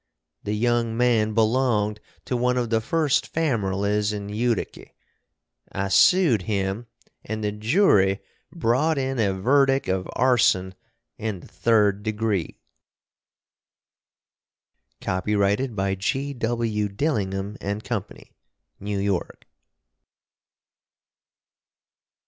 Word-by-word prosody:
The 105 - -3
young 115 0 0
man 115 -3 +2
belonged 110 -2 +1 0.3
to 125 - -2
1 125 +1 +1
of 120 -2 -1
the 110 -1 +2
first 150 +3 0
famerlies 105 -8 0
in 100 -1 -5
Utiky. 115 +1 -2 0.8
I 100 0 -2
sood 160 - +5
him 100 +3 -2 0.4
and 110 0 -5
the 105 - 0
Joory 105 - +3 0.3
brawt 150 +1 +1
in 135 -1 -2
a 100 -3 +2
verdick 135 +7 +2
of 95 0 -2
Arson 110 -7 +2 0.5
in 105 -4 -4
the - - -14
3d 105 -3 +2
degree. 105 -4 -2 2.4
Copyrighted 100 +5 0
by 95 -1 0
G.W. 115 -2 -1
Dillingham 100 -4 -2
and 100 +2 -3
Company, 105 -5 -6 0.5
New 100 0 -3
York. 100 -2 -2
110 Hz, 95 wpm, -24 LUFS, 100-125 Hz, 2.4 s, sood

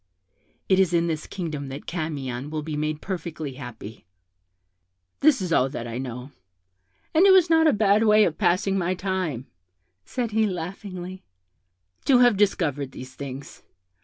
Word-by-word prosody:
It 190 -1 +4
is 180 -2 +3
in 170 0 +3
this 160 -2 -3
kingdom 155 -7 -5
that 135 +2 -8
Camion 145 -6 -4
will 155 -1 -4
be 155 0 -4
made 150 0 -2
perfectly 165 -6 -5
happy. 115 -7 -10 1.1
This 275 -8 +4
is 175 -2 -1
all 130 -2 +3
that 120 -3 -5
I 120 +1 -5
know; 125 +1 -6 0.8
and 345 +5 +6
it - - +8
was 365 -3 +5
not 320 0 +5
a - - +6
bad 210 -1 +3
way 215 0 +6
of 165 -6 -1
passing 195 +2 +2
my 180 +1 0
time' 180 -9 -2 0.6
said 235 - -3
he, 220 0 +2
laughing, 185 0 -6 0.8
'to 265 - +5
have 245 -2 +5
discovered 155 -9 0
these 130 0 -9
things. 140 +3 -8
170 Hz, 160 wpm, -25 LUFS, 140-200 Hz, 1.1 s, it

